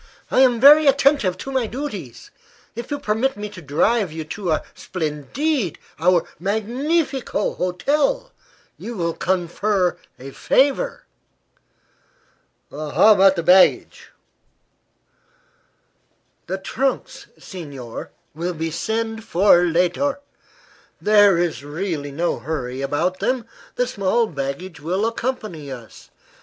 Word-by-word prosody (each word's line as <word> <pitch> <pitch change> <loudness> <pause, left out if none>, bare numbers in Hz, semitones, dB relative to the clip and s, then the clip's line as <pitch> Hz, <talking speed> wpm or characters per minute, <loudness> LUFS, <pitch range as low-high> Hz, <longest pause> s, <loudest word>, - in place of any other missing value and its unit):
I - - +3
am 250 -3 +5
very 295 +4 +8
attentive 275 -9 +3
to 270 - -7
my 260 -4 0
duties. 215 - -7 0.4
If 235 +1 -7
you 290 - -2
permit 230 +3 -1
me 210 0 -5
to 185 - -11
drive 175 - +1
you 160 0 -5
to 180 +4 -5
our 155 - 0
splendide 180 - -2 0.2
our 175 0 +3
magnifico 245 - -1
hotel 295 - 0 0.5
you 235 - -6
will 170 -2 -1
confer 185 +2 0 0.2
a 135 +2 -9
favor." 285 - +1 1.7
"How 155 +9 +4
about 195 -1 +5
the 170 - -2
baggage?" 185 +3 +4 2.4
"The 190 +2 -2
trunks, 255 +8 -3
signor, 140 - -8 0.2
we 170 +4 -3
will 165 -1 -4
send 225 +5 -3
for 185 -3 +4
later. 180 - +1 0.8
There 205 -3 +5
is 165 -7 -1
really 150 -1 -4
no 170 +5 -1
hurry 130 -4 -4
about 160 +7 -1
them. 250 -3 -1 0.3
The 250 - +1
small 230 0 +1
baggage 150 +1 -5
will 180 +7 -1
accompany 215 - -4
us. 115 -6 -11
190 Hz, 115 wpm, -21 LUFS, 160-240 Hz, 2.4 s, very